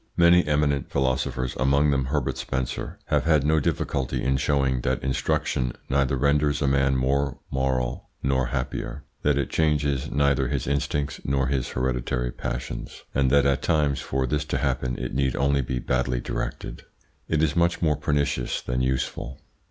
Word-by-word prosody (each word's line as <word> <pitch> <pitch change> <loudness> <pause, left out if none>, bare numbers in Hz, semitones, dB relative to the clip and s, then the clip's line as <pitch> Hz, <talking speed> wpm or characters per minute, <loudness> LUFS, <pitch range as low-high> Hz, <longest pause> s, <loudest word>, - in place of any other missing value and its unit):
Many 85 +1 +6
eminent 75 -2 +1
philosophers, 65 -1 -1
among 70 +3 +3
them 70 -2 +1
Herbert 65 -1 -1
Spencer, 65 -2 -3
have - - +1
had 80 -4 +4
no 80 +1 +3
difficulty 65 -2 -1
in 65 +1 +2
showing 70 -2 +1
that 65 +1 -1
instruction 65 -1 0 0.2
neither 70 0 +2
renders 70 +1 +2
a 70 - +1
man 70 0 +3
more 70 +1 +1
moral 65 -2 -1
nor 65 -1 +1
happier, 65 +2 -4 0.2
that 75 -1 +2
it 70 - -1
changes 75 -3 +1
neither 70 -1 +2
his - - -2
instincts 70 +1 -1
nor 65 -1 +1
his 65 -3 -1
hereditary 60 -1 -1
passions, - - -5
and 65 -1 +2
that 70 +1 +4
at 70 -1 +2
times 75 -4 +1
for 65 0 -1
this 75 +4 0
to - - -1
happen 65 -1 -1
it - - -4
need 65 0 +1
only 70 +1 +2
be 65 0 -3
badly 65 0 0
directed - - -4 0.5
it 80 -1 +1
is 80 -1 +1
much 85 0 +2
more 75 -3 +2
pernicious 70 -3 0
than 60 +1 -2
useful. 65 0 -2
70 Hz, 165 wpm, -25 LUFS, 65-70 Hz, 0.5 s, Many